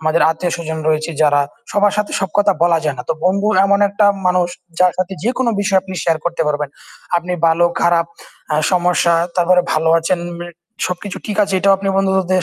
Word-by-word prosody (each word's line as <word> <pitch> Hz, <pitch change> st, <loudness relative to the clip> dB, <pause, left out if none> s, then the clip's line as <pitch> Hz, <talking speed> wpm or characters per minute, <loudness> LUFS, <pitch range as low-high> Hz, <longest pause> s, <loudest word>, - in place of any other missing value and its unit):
আমাদের 160 Hz, +1 st, +1 dB
আত্মীয়স্বজন 160 Hz, -1 st, -3 dB
রয়েছে 155 Hz, +1 st, 0 dB
যারা, 145 Hz, -1 st, +3 dB, 0.3 s
সবার 205 Hz, 0 st, +2 dB
সাথে 210 Hz, 0 st, -2 dB
সব 195 Hz, -, -2 dB
কথা 205 Hz, 0 st, +4 dB
বলা 170 Hz, -1 st, +3 dB
যায় 145 Hz, -3 st, -1 dB
না। -, -, -4 dB
তো -, -, +2 dB
বন্ধু 200 Hz, +3 st, +1 dB, 0.2 s
এমন 200 Hz, 0 st, +3 dB
একটা 205 Hz, +1 st, +2 dB, 0.2 s
মানুষ, 180 Hz, -1 st, +2 dB, 0.3 s
যার 180 Hz, -1 st, +4 dB
সাথে 185 Hz, +1 st, -2 dB
যেকোনো 245 Hz, +1 st, 0 dB
বিষয় 195 Hz, -1 st, +2 dB
আপনি 190 Hz, -1 st, -8 dB
শেয়ার 165 Hz, -2 st, +1 dB
করতে 170 Hz, -1 st, -1 dB
পারবেন। 150 Hz, -1 st, -1 dB, 0.5 s
আপনি 175 Hz, +1 st, -3 dB
ভালো 165 Hz, +1 st, +3 dB, 0.2 s
খারাপ 170 Hz, -1 st, +2 dB, 0.5 s
আ -, -, +2 dB, 0.2 s
সমস্যা, 175 Hz, -1 st, +2 dB, 0.2 s
তারপরে 180 Hz, 0 st, +4 dB
ভালো 160 Hz, +1 st, +1 dB
আছেন 170 Hz, +2 st, -1 dB, 0.2 s
মি 175 Hz, -, -6 dB, 0.4 s
সবকিছু 180 Hz, +2 st, -5 dB
ঠিক 210 Hz, -, -4 dB
আছে 200 Hz, -1 st, -1 dB
এটাও 195 Hz, +1 st, +3 dB
আপনি 195 Hz, -, -3 dB
বন্ধুদের 190 Hz, -1 st, +1 dB
180 Hz, 190 wpm, -17 LUFS, 165-195 Hz, 0.5 s, কথা